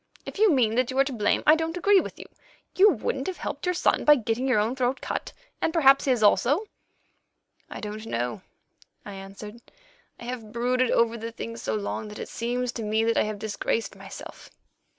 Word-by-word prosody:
If - - -8
you 430 -3 +5
mean 240 -7 +3
that 250 +1 +1
you 260 - -4
are 275 - +6
to 275 -1 -5
blame, 210 -3 +1
I 305 - +8
don't 325 +1 -3
agree 400 +2 +5
with - - -6
you. - - -9 0.5
You 405 +3 +7
wouldn't 265 - -2
have 375 - -4
helped - - -5
your 360 - +1
son - - +1
by 295 - +7
getting 240 +1 -2
your 255 - +3
own 220 +4 +1
throat 255 0 0
cut, - - -4 0.3
and - - +1
perhaps 275 -5 +5
his 250 -5 +2
also." 280 - +3 1.0
"I - - -7
don't 215 +1 -6
know," 120 - -3 0.6
I 205 - -8
answered. 195 +4 -10 0.6
"I - - -10
have 235 -3 -6
brooded 250 +2 +1
over 230 0 +2
the 230 +1 -5
thing 230 0 -7
so - - -3
long 215 +1 -4
that 210 - -9
it - - -7
seems 245 +1 -2
to 235 - -6
me 215 +1 +1
that 230 0 +1
I - - +3
have 215 -1 -4
disgraced 220 +2 -2
myself. - - -11
235 Hz, 210 wpm, -26 LUFS, 215-275 Hz, 1.0 s, I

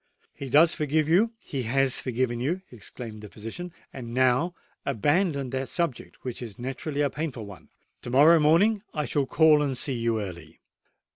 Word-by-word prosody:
"He 140 - -7
does 160 +6 +6
forgive 150 0 0
you—he 195 - +1
has 135 +2 +2
forgiven 120 -1 -1
you," 170 +10 -2
exclaimed 115 -1 -8
the 105 - -10
physician. 115 - -7 0.2
"And 120 -2 -7
now 130 +7 +2 0.3
abandon 140 - 0
that 130 0 -3
subject, 170 -8 -3
which 125 -2 -5
is 115 -5 -8
naturally 135 +4 -4
a 145 - +2
painful 140 -8 -4
one. 100 -2 -13 0.3
To - - -7
morrow 150 +6 +6
morning 185 +8 +4
I 150 -1 -1
shall 140 -2 0
call 155 0 +5
and 135 -3 -1
see 135 - -1
you 115 -2 0
early." 85 -5 -8
135 Hz, 165 wpm, -26 LUFS, 120-155 Hz, 0.3 s, does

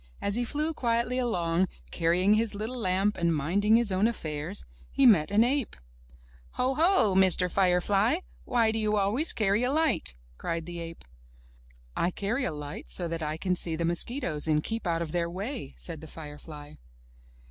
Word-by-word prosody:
As 200 - -2
he 240 +3 0
flew 300 +6 -1
quietly 240 -1 0
along, 180 -7 +1 0.2
carrying 180 +4 +3
his 215 -1 +1
little 225 +5 -4
lamp 195 0 +1
and 170 -1 +2
minding 200 +9 +2
his 230 -3 +2
own 190 +4 +3
affairs, 150 - -3 0.2
he 275 - +2
met 185 -11 +6
an 210 +3 +4
ape. 265 0 0 0.8
*'Ho, 255 +2 +1
ho, 325 - +4
Mr. 185 -1 +4
Firefly, 195 - +2 0.2
why 230 -2 +2
do 225 - -1
you 215 -1 +1
always 215 +11 +2
carry 210 0 +1
a 250 +1 +1
light?'* 305 - +1 0.2
cried 165 -1 -3
the 175 0 -6
ape. 165 0 -8 0.9
'*I 170 - +1
carry 220 +8 -2
a - - -1
light 150 -1 -7
so 175 - -4
that 165 0 -3
I 155 0 -2
can 180 +2 0
see 165 -2 -2
the 170 +1 -1
mosquitoes 170 - -2
and 150 -1 +2
keep 225 -4 -3
out 165 -1 0
of 160 - -7
their 170 0 0
way,'* 195 - -5
said 165 -3 -4
the 160 - -9
firefly. 150 -1 -10
195 Hz, 180 wpm, -28 LUFS, 165-230 Hz, 0.9 s, met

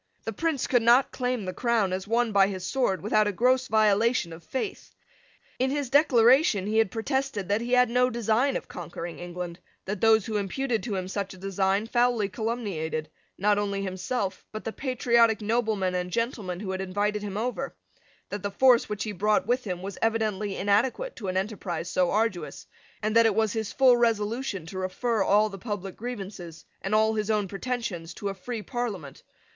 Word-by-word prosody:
The 225 - -4
Prince 315 +2 -1
could 245 -2 +3
not 240 +4 +5
claim 250 -4 -2
the 185 - -4
crown 230 -6 +1
as 190 +1 -3
won 235 +1 +1
by 195 -1 +5
his 185 -2 -5
sword 245 -8 0
without 215 0 +3
a - - +1
gross 255 +5 +2
violation 215 -3 +2
of 165 +1 -11
faith. 265 - -5 0.6
In 260 +1 +2
his 280 -2 -2
Declaration 255 -6 +5
he 215 +2 +1
had 225 - +3
protested 225 -1 -2
that 205 +2 +1
he 240 +1 -2
had 250 0 +6
no 250 +2 +2
design 235 +3 +1
of - - -9
conquering 170 0 -7
England; 175 -1 -6 0.3
that 200 0 -4
those 220 -2 +5
who 215 -2 -2
imputed 225 +3 -1
to 210 0 -3
him 185 -1 -3
such 195 0 -4
a - - -15
design 195 +2 0
foully 240 -3 +1
calumniated, 185 -8 -3 0.3
not 205 +1 +2
only 200 -1 -2
himself, 190 +2 -3
but 215 - -6
the 225 - -4
patriotic 235 -4 +2
noblemen 215 -4 0
and 180 0 -2
gentlemen 205 -4 -2
who 195 -3 -4
had 190 0 -3
invited 205 +2 -1
him 205 -1 -5
over; 250 +4 -3 0.5
that 205 - -4
the 200 - -2
force 245 +4 +4
which 210 -1 -2
he 215 - -3
brought 210 +2 +1
with 250 +1 0
him 180 -2 -4
was 195 0 -6
evidently 215 -3 0
inadequate 240 - +1
to 210 - -6
an 185 0 -1
enterprise 190 -4 -3
so 180 -1 +1
arduous; 210 -4 -1 0.4
and 215 +1 0
that 230 0 +7
it 215 - +1
was 220 -2 +1
his 220 -2 -3
full 260 -2 +5
resolution 225 -3 0
to 185 +3 -6
refer 215 +4 -1
all 205 +2 +4
the 195 -2 -8
public 195 -4 -5
grievances, 195 -8 -7 0.2
and 195 +2 0
all 220 +1 +3
his 215 -1 -2
own 210 -2 +1
pretensions, 195 -5 -4
to 200 - -3
a - - -3
free 220 +3 -6
Parliament. 205 - -5
215 Hz, 195 wpm, -27 LUFS, 190-235 Hz, 0.6 s, that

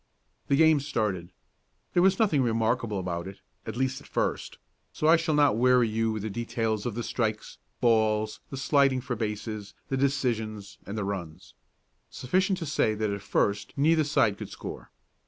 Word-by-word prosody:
The 140 - +3
game 160 0 +5
started. 105 - -2 0.6
There 175 - +4
was 190 +1 +4
nothing 195 -11 +3
remarkable 115 -2 0
about 90 -1 -3
it, 95 0 -10 0.3
at 110 +1 -5
least 130 +1 -1
at - - -15
first, - - -2 0.3
so 115 - -4
I 160 +2 +7
shall 165 -2 0
not 145 -6 +4
weary 125 -1 +4
you 110 +1 0
with 110 -1 -4
details 115 -1 -2
of 115 - -4
the 120 - -3
strikes, 110 -3 -3 0.2
balls, 110 -2 +2
the 135 - -6
sliding 135 -1 +3
for 125 -1 -3
bases, 105 -1 -4
the 135 - 0
decisions, 115 -7 -1
and 100 +2 -5
the 105 - -2
runs. 90 -6 -6 0.6
Sufficient 185 +8 0
to 170 - -4
say 130 -7 +1
that 105 -1 -1
at 100 -1 -4
first 100 +1 0
neither 155 +3 +4
side 140 -9 +2
could - - -6
score. - - -8
115 Hz, 175 wpm, -27 LUFS, 105-140 Hz, 0.6 s, I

